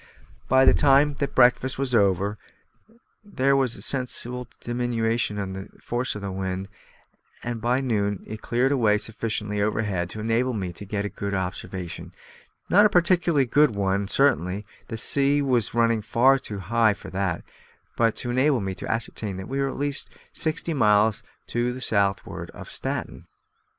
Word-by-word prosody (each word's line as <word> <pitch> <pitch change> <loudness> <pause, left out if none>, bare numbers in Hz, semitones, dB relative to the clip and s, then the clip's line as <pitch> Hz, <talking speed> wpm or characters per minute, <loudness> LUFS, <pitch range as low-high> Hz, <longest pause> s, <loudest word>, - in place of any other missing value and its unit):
By 130 +1 +5
the - - +7
time 145 +1 +4
that 140 - -2
breakfast 125 +1 +4
was 135 -2 -2
over 100 -1 +2 0.8
there 140 -10 +1
was 130 -3 +1
a - - -4
sensible 125 -2 +1
diminution 120 -3 -1
in 95 -2 -4
the 95 0 -7
force 120 0 -2
of 105 - -7
the 100 - -3
wind, 95 0 -4 0.7
and 120 -2 -4
by 125 +3 +1
noon 105 -6 -1
it 110 0 -8
cleared 125 +3 +1
away 110 -6 +3
sufficiently 105 -1 -3
overhead 100 -4 -1
to 110 - -6
enable 115 +4 0
me 95 -5 -4
to 100 - -8
get 105 0 -2
an 100 0 -4
observation, 90 -1 -5 0.5
not 205 +3 +5
a 210 - +6
particularly 170 -5 +3
good 140 -1 +3
one 100 0 0
certainly 100 - +1 0.2
the 115 - -5
sea 140 +5 +2
was 125 -6 0
running 115 -1 +2
far 130 +5 +3
too 110 -6 -7
high 110 +2 +2
for - - -11
that; 95 -2 -2 0.5
but 115 -1 +1
it - - -1
enabled 130 -1 +2
me 95 0 -3
to 95 - -5
ascertain 110 -3 -3
that 95 - -7
we 135 +1 -3
were 135 0 +1
at - - -6
least 145 0 -1 0.2
sixty 160 +1 -2
miles 105 -5 +3 0.2
to 120 +1 -1
the 125 - -7
southward 100 -5 -1
of - - -10
Staten. - - -5
115 Hz, 165 wpm, -25 LUFS, 100-130 Hz, 0.8 s, the